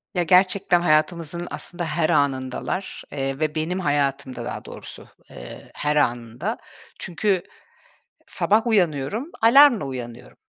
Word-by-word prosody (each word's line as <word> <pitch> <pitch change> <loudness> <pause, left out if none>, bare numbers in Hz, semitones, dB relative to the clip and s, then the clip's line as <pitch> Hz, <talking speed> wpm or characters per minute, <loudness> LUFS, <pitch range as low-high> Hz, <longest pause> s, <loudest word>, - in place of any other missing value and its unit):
Ya, 175 - +2
gerçekten 185 0 +3
hayatımızın 170 +1 +1
aslında 175 0 -4
her 160 0 0
anındalar, 135 +6 -1
eee, 135 -1 -3
ve 155 -1 -1
benim 165 +4 -2
hayatımda 140 -5 -1
daha - - -6
doğrusu, - - -9 0.2
eee, - - -11
her 150 0 -1
anında. 120 -4 -1 0.4
Çünkü 185 +2 0 0.8
sabah 220 +4 +2
uyanıyorum, 200 - 0
alarmla 240 - +6
uyanıyorum 125 -2 -8
155 Hz, 115 wpm, -23 LUFS, 135-185 Hz, 0.8 s, alarmla